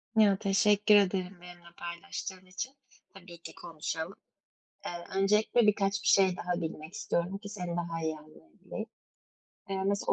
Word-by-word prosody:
Ya, 210 -3 +6
teşekkür 210 +1 +4
ederim 190 -2 +2
benimle 175 -1 -13
paylaştığın 185 +2 -6
için. 200 +9 -5 0.4
Tabii 180 -3 -12
ki, - - -9
konuşalım. 165 +1 -4 0.7
Eee, - - -2 0.3
öncelikle 210 +3 +4
birkaç 200 -1 +2
bir - - -1
şey 190 -2 +5
daha 180 0 -2
bilmek 160 0 -5
istiyorum 175 +3 -1
ki 205 0 -9
seni 180 -4 -4
daha 170 -1 -2
iyi 160 -1 -1
anlayabileyim. 150 - -9 0.9
Eee, 190 -1 -1
mesela 200 +1 +1
190 Hz, 140 wpm, -31 LUFS, 170-200 Hz, 0.9 s, Ya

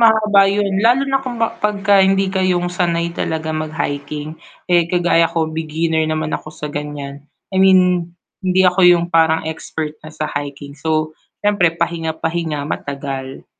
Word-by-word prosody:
mahaba 215 -3 +5
yun 200 -1 0
lalo 250 +3 +4
na 270 0 0
kung 255 -2 -5
ba 225 - +2
'pag 210 -1 0
ka 205 - +6
hindi 195 0 +3
kayong 180 -2 +1
sanay 170 -1 0
talaga 160 0 -2
mag 155 0 -3
hiking, 145 +1 -4 0.4
eh, 175 -2 +4
kagaya 175 -2 +3
ko 160 -1 0
beginner 160 0 -1
naman 155 0 -2
ako - - -6
sa 150 - -6
gan'yan, 145 -1 -6 0.3
I - - 0
mean 190 -1 +7 0.6
hindi 185 0 +2
ako 180 +1 +2
yung 175 -1 +5
parang 160 -1 +3
expert 155 -1 -5
na 155 - -8
sa 155 - -3
hiking, 140 0 -8
so, 155 0 0 0.3
s'yempre 190 -5 +2
pahinga-pahinga, 165 -2 -2
matagal. 135 -1 -5
165 Hz, 160 wpm, -18 LUFS, 155-185 Hz, 0.6 s, mean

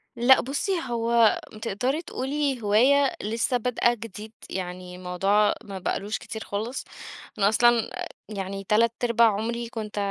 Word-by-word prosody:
لأ 245 +2 +6
بُصّي، 280 +9 -2 0.2
هو 230 -1 +3 0.2
تقدري 250 +9 -1
تقولي 275 -3 -2
هواية 255 +7 +4
لسّه 230 +4 0
بادئة 240 0 +1
جديد. 220 -1 -9 0.2
يعني 180 -1 -6
موضوع 195 +3 +2
ما 195 -2 -7
بقالوش 200 +3 -2
كتير 220 0 -7
خالص. 220 +6 -4 0.5
أنا 200 -1 +4
أصلًا 235 0 +3
أ - - -5 0.2
يعني 195 -1 -5
تلات 230 +2 +4
ارباع 235 -1 +5
عمري 230 +3 -3
كنت 215 -3 -6
225 Hz, 135 wpm, -25 LUFS, 205-240 Hz, 0.5 s, لأ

